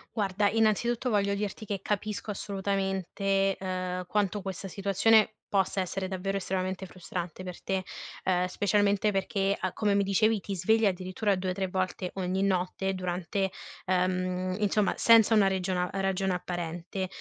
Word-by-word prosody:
Guarda, 200 Hz, -1 st, +1 dB
innanzitutto 225 Hz, +3 st, +1 dB
voglio 200 Hz, -1 st, +2 dB
dirti 210 Hz, +2 st, -4 dB
che 195 Hz, -2 st, -3 dB
capisco 210 Hz, 0 st, -2 dB
assolutamente, 195 Hz, 0 st, -1 dB
uhm, 185 Hz, -1 st, -3 dB
quanto 205 Hz, -1 st, 0 dB
questa 190 Hz, 0 st, -5 dB
situazione 200 Hz, +3 st, +3 dB
possa 195 Hz, -1 st, +1 dB
essere 190 Hz, +1 st, -3 dB
davvero 195 Hz, +1 st, -2 dB
estremamente 190 Hz, 0 st, -2 dB
frustrante 180 Hz, 0 st, -6 dB
per 180 Hz, -1 st, -7 dB
te. 190 Hz, -1 st, -1 dB, 0.4 s
Uhm, 180 Hz, -1 st, +2 dB
specialmente 205 Hz, +2 st, +2 dB
perché, 195 Hz, 0 st, 0 dB
uhm, 185 Hz, -, 0 dB
come 205 Hz, -2 st, +1 dB
mi 200 Hz, 0 st, +3 dB
dicevi, 215 Hz, +3 st, +2 dB
ti 200 Hz, -, -4 dB
svegli 220 Hz, +5 st, +3 dB
addirittura 185 Hz, +2 st, 0 dB
2 185 Hz, 0 st, -2 dB
o -, -, -1 dB
3 190 Hz, 0 st, -2 dB
volte 185 Hz, 0 st, -2 dB
ogni 185 Hz, 0 st, -1 dB
notte 190 Hz, 0 st, 0 dB
durante 185 Hz, +1 st, -2 dB, 0.3 s
ehm, 185 Hz, 0 st, 0 dB
insomma 210 Hz, -1 st, +2 dB
senza 230 Hz, -1 st, +6 dB
una 205 Hz, -2 st, +5 dB
regiona 185 Hz, -1 st, 0 dB
ragione 195 Hz, -1 st, 0 dB
apparente. 175 Hz, +1 st, -4 dB
195 Hz, 145 wpm, -29 LUFS, 185-200 Hz, 0.4 s, senza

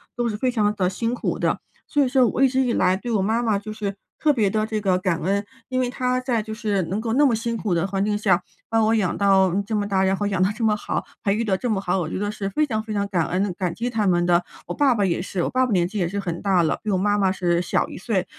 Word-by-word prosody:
都 240 Hz, 0 st, 0 dB
是 215 Hz, -, -2 dB
非 255 Hz, +3 st, 0 dB
常 210 Hz, -4 st, +1 dB
地 185 Hz, -3 st, +1 dB
辛 230 Hz, +5 st, -2 dB
苦 245 Hz, -, -2 dB
的。 -, -, 0 dB, 0.3 s
所 290 Hz, -1 st, +2 dB
以 -, -, +1 dB
说 260 Hz, -1 st, +4 dB
我 245 Hz, -, -1 dB
一 270 Hz, -, +6 dB
直 265 Hz, +1 st, +1 dB
以 245 Hz, -3 st, +1 dB
来 185 Hz, 0 st, +2 dB
对 240 Hz, +5 st, -5 dB
我 210 Hz, -4 st, +2 dB
妈 225 Hz, +4 st, +1 dB
妈 215 Hz, -4 st, +1 dB
就 215 Hz, +1 st, -7 dB
是 205 Hz, -2 st, -4 dB, 0.2 s
特 305 Hz, -, +3 dB
别 220 Hz, -8 st, +2 dB
地 215 Hz, +1 st, 0 dB
这 220 Hz, -1 st, -2 dB
个 190 Hz, -3 st, +2 dB
感 185 Hz, -3 st, -1 dB
恩， 200 Hz, +3 st, 0 dB, 0.2 s
因 255 Hz, -1 st, -1 dB
为 245 Hz, -, 0 dB
她 250 Hz, 0 st, 0 dB
在 245 Hz, -4 st, 0 dB
就 220 Hz, 0 st, -7 dB
是 210 Hz, -4 st, -1 dB
能 190 Hz, +6 st, -3 dB
够 225 Hz, 0 st, -2 dB
那 290 Hz, +3 st, +4 dB
么 245 Hz, -5 st, +3 dB
辛 230 Hz, +1 st, -2 dB
苦 205 Hz, -5 st, -1 dB
的 170 Hz, +2 st, +1 dB
环 195 Hz, 0 st, -1 dB
境 210 Hz, 0 st, 0 dB
下， 185 Hz, -4 st, +2 dB, 0.3 s
把 225 Hz, -, +2 dB
我 220 Hz, +1 st, +3 dB
养 195 Hz, -5 st, 0 dB
到 190 Hz, -3 st, +4 dB
这 220 Hz, -, -1 dB
么 205 Hz, -1 st, 0 dB
大， 190 Hz, -1 st, +1 dB
然 190 Hz, 0 st, +2 dB
后 205 Hz, -, -2 dB
养 195 Hz, -2 st, 0 dB
到 185 Hz, -, +4 dB
这 230 Hz, -, -4 dB
么 215 Hz, -1 st, +3 dB
好， -, -, -3 dB, 0.2 s
培 200 Hz, 0 st, +2 dB
育 230 Hz, -, 0 dB
的 200 Hz, -4 st, +1 dB
这 245 Hz, -, -3 dB
么 200 Hz, -3 st, 0 dB
好， 185 Hz, 0 st, 0 dB
我 160 Hz, -2 st, -2 dB
觉 -, -, -3 dB
得 205 Hz, +1 st, -2 dB
是 200 Hz, -2 st, -4 dB
非 305 Hz, +10 st, +1 dB
常 220 Hz, -6 st, -2 dB
非 220 Hz, -1 st, -6 dB
常 200 Hz, -1 st, 0 dB
感 175 Hz, -5 st, 0 dB
恩， 190 Hz, +1 st, -1 dB
感 180 Hz, -3 st, -2 dB
激 240 Hz, +2 st, -2 dB
他 220 Hz, -4 st, 0 dB
们 175 Hz, -1 st, +2 dB
的。 175 Hz, 0 st, +3 dB, 0.2 s
我 -, -, -3 dB
爸 275 Hz, -4 st, +3 dB
爸 205 Hz, -, +1 dB
也 175 Hz, -2 st, 0 dB
是， 180 Hz, -1 st, -3 dB
我 -, -, 0 dB
爸 255 Hz, +1 st, +2 dB
爸 245 Hz, -, -1 dB
年 175 Hz, -2 st, +3 dB
纪 210 Hz, +4 st, -6 dB
也 175 Hz, -, +1 dB
是 200 Hz, +4 st, -3 dB
很 175 Hz, -3 st, -4 dB
大 190 Hz, -4 st, +3 dB
了， 155 Hz, -, 0 dB
比 215 Hz, -, -3 dB
我 195 Hz, -, +2 dB
妈 205 Hz, +2 st, +1 dB
妈 195 Hz, -2 st, +2 dB
是 175 Hz, -2 st, +1 dB
小 175 Hz, -, 0 dB
一 -, -, -8 dB
岁。 190 Hz, -1 st, -1 dB
205 Hz, 335 characters per minute, -23 LUFS, 190-230 Hz, 0.3 s, 一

